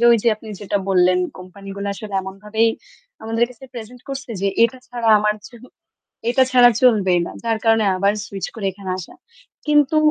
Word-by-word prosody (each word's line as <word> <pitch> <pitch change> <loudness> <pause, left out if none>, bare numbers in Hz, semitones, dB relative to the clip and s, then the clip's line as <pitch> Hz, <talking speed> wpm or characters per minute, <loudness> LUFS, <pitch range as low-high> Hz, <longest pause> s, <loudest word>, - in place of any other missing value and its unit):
যে - - +3
ওই 235 - +6
যে 235 - +3
আপনি 220 - -15
যেটা 205 0 -1
বললেন 180 -1 +4 0.2
কোম্পানি 185 +2 -12
গুলো 200 - -4
আসলে 205 -1 -8
এমনভাবেই 210 +4 -1 0.5
আমাদের 225 +1 +1
কাছে 250 +2 -14
প্রেজেন্ট 240 +2 -9
করছে 270 -2 -6
যে 200 - +1
এটা 235 +3 +2
ছাড়া 240 -2 -2
আমার 210 0 +1
তো - - -19 0.8
এটা 260 +2 +4
ছাড়া 245 -1 +7
চলবেই 195 -8 +4
না। - - -7
যার 225 -1 0
কারণে 225 -1 +4
আবার 200 +2 +2
সুইচ 195 -1 -5
করে 215 -4 -4
এখানে 190 0 -7
আসা। 180 - -9 0.5
কিন্তু 295 0 +3
220 Hz, 185 wpm, -20 LUFS, 195-240 Hz, 0.8 s, ছাড়া